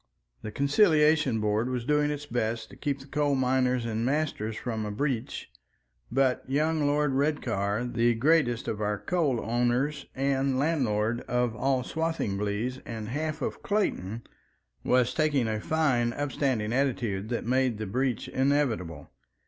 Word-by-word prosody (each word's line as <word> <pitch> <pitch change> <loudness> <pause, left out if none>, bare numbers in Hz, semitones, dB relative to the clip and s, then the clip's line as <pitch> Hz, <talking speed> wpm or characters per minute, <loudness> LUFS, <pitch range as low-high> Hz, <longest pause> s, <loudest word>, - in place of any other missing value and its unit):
The 110 - -5
Conciliation 150 - +3
Board 105 +3 0
was 125 -2 -3
doing 150 +1 +2
its 145 0 -4
best 115 -3 -2
to - - -11
keep 140 -2 -3
the - - -12
coal 145 0 0
miners 125 -1 +1
and 115 0 -2
masters 130 -5 -1
from 110 -1 -3
a 105 - -3
breach, 120 +2 -3 0.6
but 130 0 +2
young 155 +2 +1
Lord 145 0 +2
Redcar, 125 -7 0
the 120 -1 +2
greatest 125 -2 +2
of 110 -1 -3
our 105 0 0
coal 140 - 0
owners 125 +5 0
and 135 0 +1
landlord 120 -6 +1
of 125 -2 0
all 130 +1 +1
Swathinglea 125 -6 -2
and 110 -2 -6
half 155 +3 -3 0.2
Clayton, 120 - -1 0.6
was 125 0 +2
taking 145 -5 +1
a 110 -1 -2
fine 130 -7 +1
upstanding 135 -6 -1
attitude 115 -7 -1
that 120 - -2
made 130 -1 +1
the 110 - -4
breach 125 +4 -1
inevitable. 130 - 0
125 Hz, 140 wpm, -28 LUFS, 115-145 Hz, 0.6 s, Conciliation